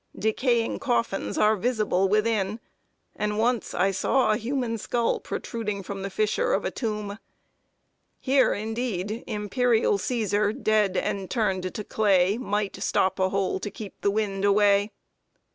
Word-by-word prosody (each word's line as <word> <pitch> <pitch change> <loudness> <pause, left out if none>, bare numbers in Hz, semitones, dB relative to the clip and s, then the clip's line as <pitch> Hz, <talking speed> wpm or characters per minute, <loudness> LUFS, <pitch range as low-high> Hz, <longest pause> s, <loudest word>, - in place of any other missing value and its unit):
Decaying 230 +3 +1
coffins 240 -7 -1
are 215 +1 +4
visible 210 -4 +1
within; 215 0 +1 0.6
and 210 0 -2
once 235 +1 0
I 190 +2 +2
saw 215 +6 +2
a 215 - +2
human 235 -1 -2
skull 235 +2 0
protruding 210 -4 -4
from 195 +1 -6
the 195 - -3
fissure 215 - 0
of - - 0
a - - -1
tomb. 210 -3 -4 1.0
Here, 265 0 +3
indeed, 220 -1 -3
"Imperial 220 0 +1
Cæsar, 210 -1 0
dead, 210 -3 +2
and 195 -2 -2
turned 190 -6 -1
to 210 - -4
clay, 200 -1 +2
Might 205 -4 -2
stop 190 +1 +1
a 185 0 +2
hole 195 -1 -1
to 205 - -4
keep 205 0 -8
the 200 - +2
wind 200 -2 -1
away." 205 0 +4
210 Hz, 145 wpm, -26 LUFS, 195-230 Hz, 1.0 s, are